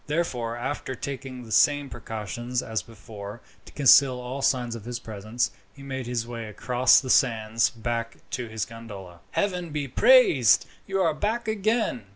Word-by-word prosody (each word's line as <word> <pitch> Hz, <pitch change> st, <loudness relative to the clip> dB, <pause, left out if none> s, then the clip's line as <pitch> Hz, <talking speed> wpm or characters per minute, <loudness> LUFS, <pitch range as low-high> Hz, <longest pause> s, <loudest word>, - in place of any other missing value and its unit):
Therefore, 125 Hz, -7 st, -2 dB
after 130 Hz, +1 st, -4 dB
taking 130 Hz, -1 st, -6 dB
the 115 Hz, -, -12 dB
same 145 Hz, +5 st, +4 dB
precautions 120 Hz, +1 st, -4 dB
as 110 Hz, -3 st, -2 dB
before, 105 Hz, 0 st, -10 dB, 0.3 s
to -, -, -13 dB
conceal 135 Hz, -2 st, +6 dB
all 125 Hz, +2 st, -5 dB
signs 125 Hz, -3 st, +1 dB
of 115 Hz, -2 st, -8 dB
his 120 Hz, 0 st, -4 dB
presence, 110 Hz, +2 st, -3 dB, 0.2 s
he 140 Hz, -, -12 dB
made 130 Hz, -2 st, -5 dB
his 120 Hz, -1 st, -2 dB
way 115 Hz, -2 st, -6 dB
across 125 Hz, +3 st, +3 dB
the 130 Hz, -, -2 dB
sands 115 Hz, -2 st, +3 dB
back 115 Hz, 0 st, -4 dB
to 125 Hz, -2 st, -3 dB
his 110 Hz, -1 st, -3 dB
gondola. 100 Hz, -6 st, -10 dB
"Heaven 180 Hz, -4 st, -1 dB
be 145 Hz, -2 st, -3 dB
praised, 145 Hz, -, +5 dB, 0.2 s
you 195 Hz, 0 st, -1 dB
are 165 Hz, -4 st, +2 dB
back 220 Hz, +8 st, -2 dB
again!" 215 Hz, -, 0 dB
125 Hz, 165 wpm, -26 LUFS, 115-140 Hz, 0.3 s, conceal